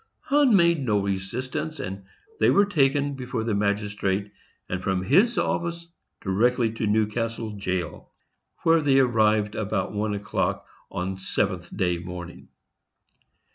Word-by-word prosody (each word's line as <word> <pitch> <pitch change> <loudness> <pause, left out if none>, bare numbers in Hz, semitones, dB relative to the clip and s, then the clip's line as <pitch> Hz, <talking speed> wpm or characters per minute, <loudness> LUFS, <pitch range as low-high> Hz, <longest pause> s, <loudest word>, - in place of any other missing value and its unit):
Hunn 280 -5 +4
made 170 -5 +4
no 105 -5 +2
resistance, 125 +11 -3
and 95 +1 -6 0.3
they - - +5
were 200 +1 +5
taken 145 -6 +2
before 125 -4 -4
the 115 -1 -1
magistrate, 100 -1 -1 0.4
and 90 0 -3
from 95 -1 -1
his 195 - +4
office 170 0 -1 0.3
direct 110 +6 +2
to 115 -2 0
Newcastle 110 +1 0
jail, 90 -4 -4 0.5
where 165 0 +5
they 140 -2 +3
arrived 110 -5 +3
about 105 -1 -2
one 105 0 -1
o'clock 100 0 -2 0.2
on 95 +1 -3
7th 95 -2 -2
day 90 -2 +1
morning. 90 -1 -8
110 Hz, 130 wpm, -25 LUFS, 95-140 Hz, 0.5 s, they